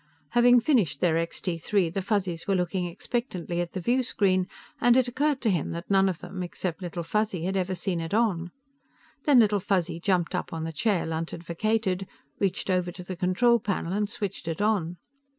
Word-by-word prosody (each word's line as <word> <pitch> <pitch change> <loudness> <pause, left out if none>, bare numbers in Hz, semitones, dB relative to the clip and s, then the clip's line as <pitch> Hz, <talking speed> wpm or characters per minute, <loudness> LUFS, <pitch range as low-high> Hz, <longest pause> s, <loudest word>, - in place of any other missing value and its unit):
Having 245 0 +5
finished 210 - +2
their 170 -1 +2
Extee 165 +1 -2
Three, 190 +1 +1
the 180 +4 -2
Fuzzies 185 -5 -1
were 195 - +2
looking 180 0 0
expectantly 175 - -3
at 175 - -5
the 190 - -3
viewscreen, 200 -4 +1 0.3
and 245 +1 +5
it 255 -1 +3
occurred 280 +3 0
to 220 - +2
him 170 -4 -1
that 170 +4 -6
none 195 0 +5
of 180 -3 -4
them 185 +1 -6
except 180 0 -4
Little 175 -1 -4
Fuzzy 210 -1 -1
had 190 +1 -1
ever 185 0 0
seen 180 -2 -2
it 165 - -5
on. 200 -6 +1 0.8
Then 290 -3 +6
Little 210 -3 +5
Fuzzy 175 -3 0
jumped 180 -2 +1
up - - -3
on 160 -1 -3
the 165 0 -4
chair 195 +3 +1
Lunt 160 0 -3
had 170 - -8
vacated, 195 +1 -1 0.3
reached 195 0 0
over 180 -1 +1
to 180 +1 -9
the 185 +1 -6
control 190 +7 +3
panel 190 -4 -2
and 205 0 0
switched 205 -6 -4
it 165 -1 -3
on. 195 -5 +1
185 Hz, 200 wpm, -27 LUFS, 170-210 Hz, 0.8 s, Then